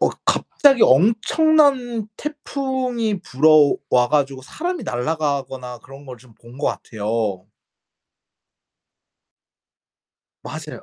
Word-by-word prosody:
어 - - +3 0.2
갑자기 275 -4 +2
엄청난 245 - +3
태풍이 260 -7 -3
불어와 140 -3 +3
가지고 140 -3 0
사람이 350 - -5
날아가거나 135 -2 -3
그런 135 +1 -14
걸 125 -1 -9
좀 115 -2 -20
본 120 +2 -16
것 150 - -1
같아요. 105 -3 -3 3.0
맞아요. - - -9
150 Hz, 200 characters per minute, -20 LUFS, -, 3.0 s, 어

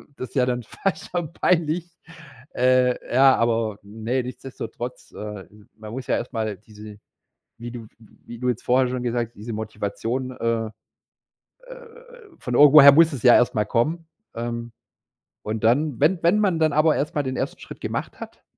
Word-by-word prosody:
das 130 - -7
ist - - -21
ja 130 -2 +3
dann 125 -1 -2
fast 195 - -4
schon 175 -3 -3
peinlich. 170 -1 0 0.7
Äh, 125 0 +2
ja, 135 +1 +6
aber, 115 -2 0
ne, 110 +5 -3
nichtsdestotrotz, 125 -1 -8
äh, 105 -2 -7 0.3
man 110 -1 -10
muss 130 +2 -7
ja - - +1
erstmal 110 -4 -3
diese, 105 0 -13 0.6
wie 120 +1 -7
du 120 -1 -8
w - - -14
w 110 - -20
wie 120 -1 -10
du 125 0 -1
jetzt 120 -2 -3
vorher 125 +1 +2
schon 125 0 -3
gesagt 120 -1 -1
hast, - - -40
diese 110 +3 -7
Motivation, 110 +4 -4
äh, 115 -2 -1 1.0
äh, - - -9 0.6
von 125 - -5
irgendwoher 145 +1 +9
muss 165 +3 +5
es 130 -6 -6
ja 120 - +8
erst 120 - +3
mal 105 - +1
kommen, 155 +10 -1 0.3
ähm. 115 0 -5 0.7
Und 110 0 -4
dann, 130 +4 +2
wenn 165 +5 +3
wenn 175 +5 +4
man 190 -6 +1
dann 155 -1 +3
aber 155 +1 +3
erstmal 150 0 -1
den 130 -1 -4
1. - - -4
Schritt - - -11
gemacht - - -5
hat - - -11
125 Hz, 180 wpm, -23 LUFS, 115-145 Hz, 1.0 s, irgendwoher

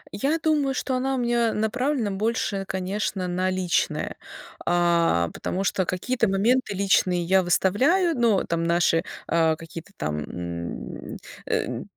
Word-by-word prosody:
Я 280 +10 +1
думаю, 300 -4 +1
что 260 - -2
она 265 +1 0
у - - -2
меня 235 -2 +1
направлена 240 +1 0
больше, 200 -1 -1
конечно, 190 0 -2
на 180 +1 0
личное, 185 -2 -1 0.5
а, 170 - +2
потому 190 - -3
что 190 -1 0
какие-то 230 +6 0
моменты 210 +3 +1
личные 185 -2 +2
я 190 +3 +4
выставляю, 260 - +2
но 230 -6 +3
там 170 0 -1
наши, 170 -1 +2 0.2
а, 160 -1 +3
какие-то 165 +3 -10
там, 75 0 -2
м, 85 -5 -6 0.3
э, - - -1
195 Hz, 135 wpm, -25 LUFS, 170-240 Hz, 0.5 s, я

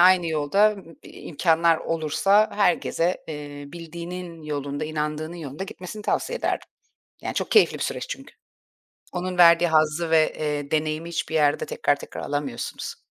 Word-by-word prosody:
aynı 180 -1 +6
yolda, 160 +7 +3
ımm, 185 -6 -12
i - - -13
imkânlar 165 +1 +2
olursa 165 +7 +2
herkese, 180 -2 +1
eee, 145 -2 -7
bildiğinin 170 0 -7
yolunda, 145 -1 -3
inandığının 155 +2 -3
yolunda 155 +2 -6
gitmesini 195 +2 -8
tavsiye 485 - -1
ederdim. - - -2 0.5
Yani, - - -3
çok - - -2
keyifli 430 - +5
bir - - -3
süreç - - -3
çünkü. - - -8 0.8
Onun 180 0 -3
verdiği 170 0 +7
hazzı 155 +1 +2
ve, 160 -1 +4
eee, 150 -2 -2
deneyimi 155 +1 -1
hiçbir 165 -1 -3
yerde 145 -2 +3
tekrar 145 - +1
tekrar - - -8
alamıyorsunuz. 145 -4 -4
160 Hz, 145 wpm, -24 LUFS, 150-175 Hz, 0.8 s, verdiği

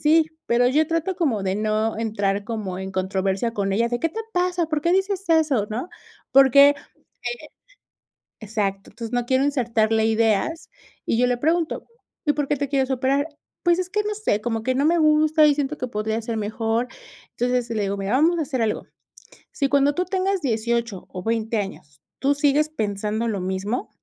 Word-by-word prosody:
Sí, 315 +1 +5 0.2
pero 240 +1 +3
yo 295 +5 +3
trato 330 +3 -1
como 280 - 0
de 190 0 0
no 215 +1 0
entrar 205 -3 -1
como 210 -5 -4
en 190 0 -5
controversia 190 +3 -1
con 200 -3 -1
ella, 230 +4 +2
de: 240 0 -2
"¿Qué 330 - +1
te 445 +7 -5
pasa?, 360 -1 +1
¿por 310 -1 -1
qué 340 +4 +1
dices 385 0 0
eso?", 305 -10 +3
¿no?, 245 +11 -4 0.4
porque 275 +1 +7
eh 480 +10 -8 0.9
exacto, 200 -2 -3
entonces, 230 +1 -7
no 245 -1 +1
quiero 260 +2 +2
insertarle 230 -5 +1
ideas, 225 +7 +1 0.4
y 225 - +1
yo 250 - +4
le 245 -1 0
pregunto: 325 +4 0 0.4
"¿Y 295 - +3
por 290 -2 -1
qué 295 - +1
te 285 0 -2
quieres 270 -1 0
operar?". 270 +3 +1 0.4
"Pues, 345 -1 +3
es 365 -1 -2
que 420 +2 0
no 420 0 -2
sé, 405 - -1
como 225 -2 -2
que 255 +2 0
no 275 +2 +1
me 335 +2 +3
gusta 310 0 +4
y 295 - +4
siento 290 +1 -2
que 255 - -2
podría 220 0 -2
ser 225 0 -3
mejor". 225 +3 -1 0.4
Entonces, 245 -1 -1
le 215 -2 -1
digo: 200 +1 -2
"Mira, 195 +2 -3
vamos 325 +6 +3
a - - +1
hacer 270 -4 -3
algo. 215 - -1 0.7
Si 275 - 0
cuando 280 +1 +3
tú 360 - 0
tengas 380 0 -1
18 235 -4 -1
o 185 -1 -7
20 225 +1 -1
años, 150 -8 -7 0.2
tú 280 +1 +2
sigues 290 +1 +2
pensando 215 -4 -2
lo 205 -4 -2
mismo 190 +6 -2
245 Hz, 190 wpm, -23 LUFS, 215-305 Hz, 0.9 s, porque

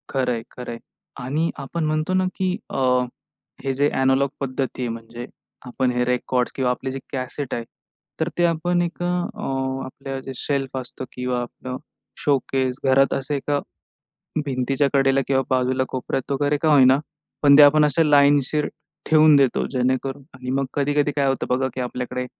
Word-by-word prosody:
खरंय, 125 -4 0
खरंय. 120 -2 -7 0.4
आणि 150 +6 -1
आपण 150 +4 -3
म्हणतो 155 +3 0
ना, 185 0 +2
की 185 0 -1
अ, - - -4 0.9
हे 135 -1 0
जे 140 +2 +2
एनालॉग 135 +1 +3
पद्धती 130 -1 -3
आहे, 120 - -1
म्हणजे 115 +1 -7 0.4
आपण 125 +1 0
हे 125 0 0
रेकॉर्ड्स 125 0 0
किंवा 130 -2 +1
आपलं 130 +1 -4
जे 135 +1 -4
कॅसेट 130 +1 -4
आहे, 120 - -2 0.6
तर 160 +1 0
ते 175 - +4
आपण 175 +1 +1
एक 175 0 -3
अ, - - 0 0.8
आपलं 135 +1 -6
जे 135 - -5
शेल्फ 135 0 -2
असतो 130 +1 -6
किंवा 125 -1 -2
आपलं 125 +1 -6 0.5
शोकेस 130 -2 +1
घरात 135 +1 +4
असे 135 +2 -2
एका, 145 +1 -1 0.9
भिंतीच्या 135 +1 +1
कडेला 135 0 +4
किंवा 135 -1 +2
बाजूला 130 0 +1
कोपऱ्यात 130 +1 -3
वगैरे 145 +1 +1
का 160 - +3
होईना 130 -1 +6 0.4
पण 140 -1 +7
ते - - +10
आपण 150 +1 +7
अशा 150 +2 +3
लाईनशीर 145 0 +4 0.4
ठेवून 155 -1 +6
देतो, 135 -3 +2
जेणेकरून 130 +2 -1
आणि 130 0 -6
मग 135 +1 +1
कधी-कधी 145 +1 +1
काय 140 -1 +2
होतं 135 - -1
बघा, 130 +1 +1
की 130 - -4
आपल्याकडे 125 0 -3
135 Hz, 165 wpm, -22 LUFS, 125-145 Hz, 0.9 s, ते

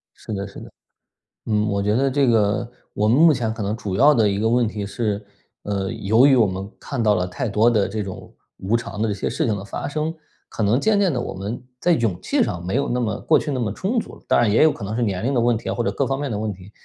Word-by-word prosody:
是 110 - -8
的 100 0 -3
是 100 - -11
的， - - -11 0.8
嗯， 105 -1 +1
我 100 0 0
觉 105 +2 +1
得 135 +2 +2
这 140 0 +2
个 115 +1 +2 0.2
我 105 +1 +1
们 120 - +4
目 165 -2 +7
前 115 -4 -2
可 110 - -6
能 100 +2 -1
主 100 -5 -4
要 145 +6 +6
的 110 -6 +3
一 100 0 0
个 110 - +1
问 120 0 +2
题 105 -1 -4
是， 105 0 -3 0.4
呃 100 -2 -2
由 110 +6 +3
于 140 -2 +6
我 115 -3 +5
们 95 +1 -4
看 140 -4 -4
到 105 -2 +3
了 90 -1 -1
太 90 +7 -3
多 110 +4 +3
的 105 -4 +2
这 105 +1 -3
种 95 -2 -9 0.2
无 100 +5 -1
常 115 -2 -4
的 115 - +2
这 105 - 0
些 100 - -3
事 - - -1
情 110 -3 +1
的 95 - -6
发 100 - -5
生， 155 +2 -2 0.4
可 110 - -3
能 105 +5 +3
渐 210 +4 +2
渐 190 -5 +2
的 125 - -1
我 - - -5
们 100 +6 -5 0.2
在 175 - +2
勇 110 - 0
气 - - +1
上 90 -1 -4
没 95 - -2
有 140 +2 0
那 125 +1 0
么 110 -3 -2
过 155 - +4
去 150 - -4
那 130 - -2
么 110 -4 -1
充 215 - -1
足， - - -9
当 - - +3
然 115 -3 +3
也 110 - +5
有 155 - +6
可 - - -8
能 105 +3 -3
是 125 - -1
年 100 -3 -1
龄 135 +3 0
的 125 - +2
问 120 -1 +2
题 - - -6
啊， - - -1
或 120 - -1
者 - - 0
各 140 - -1
方 135 0 -1
面 145 - -3
的 105 - -2
问 110 0 -2
题， 95 +2 -14
110 Hz, 315 characters per minute, -22 LUFS, 100-125 Hz, 0.8 s, 目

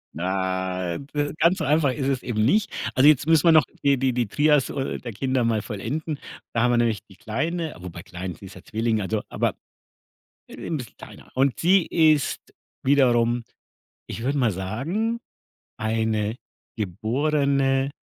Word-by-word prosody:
Nei 95 0 -1 0.2
äh, 145 0 -1
ganz 170 +4 +4
so 160 - -2
einfach 145 -1 +3
ist 135 +1 -2
es 135 -2 0
eben 110 -3 0
nicht. 205 - +2 0.2
Also, 130 +3 +5
jetzt 150 -1 +4
müssen 160 0 +4
wir - - +8
noch 155 -1 +7 0.2
die 140 -1 +4
die 130 -1 +1
die 120 -3 0
Trias 150 +2 +3
o 135 - -2
der 120 - -7
Kinder 130 +4 0
mal 115 -2 +1
vollenden. 140 +9 -4 0.3
Da 115 - +1
haben 125 +1 +3
wir 120 - +3
nämlich 115 -4 +1
die 95 - -15
Kleine 155 - -3
wobei 90 -1 -8
klein, 90 0 -6
sie 100 - -13
ist 95 - -11
ja - - -13
Zwilling, 110 0 -1
also 105 +2 -1
aber, - - -1 0.9
äh, - - -11
'n 160 - -2
bisschen 125 -4 -9
kleiner. - - -13
Und 135 0 +2
sie 185 +1 +4
ist 155 -4 +3 0.4
wiederum, 120 -3 +3 0.6
ich 115 - -6
würde 140 +3 0
mal 120 -5 +2
sagen, 145 - -2 0.6
eine 110 -1 0 0.4
geborene 135 - +1
125 Hz, 170 wpm, -24 LUFS, 110-145 Hz, 0.9 s, wir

